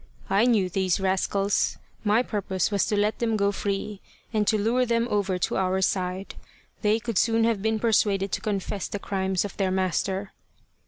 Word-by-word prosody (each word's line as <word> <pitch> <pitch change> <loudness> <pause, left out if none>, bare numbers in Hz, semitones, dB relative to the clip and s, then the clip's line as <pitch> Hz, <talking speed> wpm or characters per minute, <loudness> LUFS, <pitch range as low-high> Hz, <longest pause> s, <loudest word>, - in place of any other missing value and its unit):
" - - -25
I 200 +4 +4
knew 215 -6 +3
these 185 0 0
rascals. 195 +1 +1 0.3
My 215 +3 +3
purpose 195 -4 -1
was 200 -1 +1
to 210 - 0
let 210 +1 +1
them 225 -2 +1
go 200 0 +2
free, 200 0 -3 0.3
and 210 -2 +1
to 220 - +3
lure 230 +5 +2
them 235 -1 +1
over 200 -3 +1
to 180 - -1
our 190 0 +1
side: 185 0 -1 0.5
they 210 0 +3
could 230 -4 -1
soon 225 -1 +2
have 225 -3 +1
been 220 +1 +1
persuaded 205 -3 +2
to - - -2
confess 200 -1 -2
the - - -4
crimes 190 -1 -1
of 200 - -7
their 195 -2 +1
master." 190 +1 -1
200 Hz, 190 wpm, -26 LUFS, 190-220 Hz, 0.5 s, I